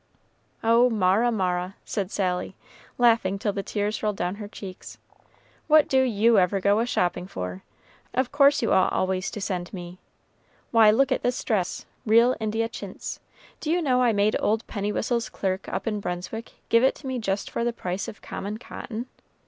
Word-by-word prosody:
"Oh, 230 +2 +5
Mara, 215 +2 +3
Mara," 185 -2 -1
said 195 -3 -2
Sally, 185 -2 -2 0.4
laughing 225 -5 +3
till 205 0 -1
the 200 - -2
tears 205 +2 -2
rolled 210 -1 0
down 180 +1 -1
her 210 -1 -6
cheeks, 195 -3 -9 0.7
"what 310 -1 +6
do 265 -1 +3
you 230 -3 +4
ever 185 +2 +2
go 200 +2 +3
a 235 - 0
shopping 180 -4 0
for? 90 - -5 0.5
of 255 0 0
course 280 -2 +4
you 225 - +2
ought 190 - +4
always 185 0 0
to 215 - -6
send 185 -3 -3
me. 180 -1 -8 0.7
Why, 225 -2 +7
look 265 +5 +3
at 260 - +1
this 245 0 -1
dress 200 -6 -1 0.2
real 235 +3 +5
India 220 +1 -1
chintz; 230 - -7 0.4
do 305 - -4
you 345 +2 +3
know 255 -6 +2
I 245 -2 +4
made 205 0 +2
old 220 +2 0
Pennywhistle's 220 +3 -2
clerk 190 -2 -3
up 190 - -3
in 210 -2 -1
Brunswick 180 +5 -5 0.2
give 230 +1 +5
it 265 - +4
to - - -14
me 260 -1 -2
just 200 -3 -2
for 235 - -1
the 240 - +1
price 185 -4 -4
of 205 - -10
common 205 +2 -5
cotton? 230 0 -7
210 Hz, 180 wpm, -25 LUFS, 190-235 Hz, 0.7 s, Why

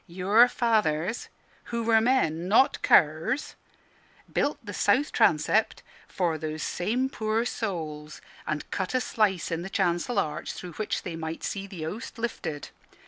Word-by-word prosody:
Your 195 +7 +4
fathers 220 -6 0 0.4
(who 235 -1 -3
were 225 -1 +4
men, 180 -9 +1
not 225 +7 +4
curs) 160 - +3 0.8
built - - +1
the - - -6
south 285 +3 +2
transept - - +2 0.2
for 170 -4 -1
those 155 0 -4
same 235 +9 0
poor 220 -2 -1
souls, 155 -10 -4 0.3
and 150 -1 -3
cut 190 +6 -2
a - - +4
slice 200 -8 0
in 165 0 -1
the 190 - -6
chancel 190 +4 0
arch 150 0 -1
through 180 -2 -8
which 215 +4 -3
they 170 - -5
might 160 0 -5
see 195 -1 -3
the 185 -5 -7
Host 210 +12 -6
lifted. 160 - -4
190 Hz, 145 wpm, -27 LUFS, 160-230 Hz, 0.8 s, Your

